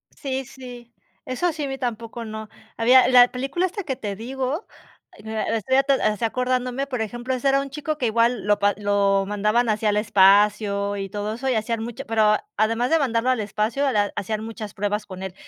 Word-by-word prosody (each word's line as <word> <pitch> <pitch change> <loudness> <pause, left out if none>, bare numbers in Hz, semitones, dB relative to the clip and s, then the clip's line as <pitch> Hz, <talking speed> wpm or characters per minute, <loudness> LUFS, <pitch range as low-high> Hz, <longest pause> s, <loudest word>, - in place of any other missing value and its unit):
Sí, 265 -2 -4
sí, 245 -2 -11 0.3
eso 295 +8 -1
sí, 300 - -4
a - - -2
mí 270 0 -4
tampoco, 235 -2 -5
no, 220 0 -7 0.3
había 250 +3 +6
la 245 -1 +6
película 270 +8 -1
esta 395 +2 -4
que 275 -5 -3
te 210 -5 -5
digo, 265 - -4 0.5
estoy 220 +3 -1 0.3
así 215 +1 +1
acordándome, 255 +2 -1
por 250 -4 -3
ejemplo, 240 +4 -3
ese 255 +2 -1
era 275 0 +3
un 275 - -6
chico 300 +2 -4
que 250 - 0
igual 230 -1 +1
lo 205 0 +2 0.2
lo 200 -1 +2
mandaban 210 +4 +1
así 215 0 -1
al 210 - +3
espacio 205 0 +3
y 195 -1 -4
todo 210 +1 -3
eso 265 +2 -3
y 255 - +1
hacían 220 +1 -1
mucho 240 +4 -7
pero 215 -3 +3 0.2
además 230 +3 +1
de 325 0 +3
mandarlo 245 -2 0
al 255 -2 +2
espacio, 215 +6 -1
la 205 -3 +1
hacían 215 +2 -3
muchas 220 -2 -7
pruebas 205 +1 -2
con 190 -1 -9
él. 190 - -5
230 Hz, 195 wpm, -23 LUFS, 210-255 Hz, 0.5 s, había